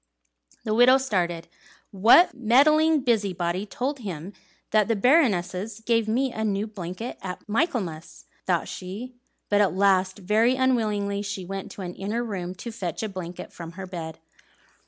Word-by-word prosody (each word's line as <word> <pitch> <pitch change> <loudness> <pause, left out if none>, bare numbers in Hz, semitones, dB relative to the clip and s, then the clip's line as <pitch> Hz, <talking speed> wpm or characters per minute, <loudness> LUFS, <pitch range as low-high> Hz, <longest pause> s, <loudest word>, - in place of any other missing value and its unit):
The 215 - -1
widow 245 +3 +6
started. 175 -10 -1 0.4
"What 225 - +6
meddling 290 +6 +4
busybody 195 -6 0
told 270 +6 -3
him 190 -4 -6 0.4
that 215 -2 +3
the 230 - +1
Baroness 205 - +2
gave 230 -1 +1
me 255 +4 +1
a 220 - -3
new 205 -1 0
blanket 205 +2 -7
at 185 +1 -7
Michaelmas?" 210 - -2 0.2
thought - - +1
she; 205 +8 -7 0.3
but 205 0 +3
at 195 -3 +2
last, 190 -1 +2
very 215 +6 +2
unwillingly, 215 -6 0
she 200 -2 -5
went 195 +1 -6
to 195 - -7
an 180 -1 -5
inner 210 +6 -3
room 185 -5 -5
to 235 +5 -7
fetch 185 -4 -4
a 220 - -2
blanket 180 -2 -7
from 170 -1 -9
her 190 +2 -7
bed. 165 -3 -7
205 Hz, 155 wpm, -25 LUFS, 185-235 Hz, 0.4 s, widow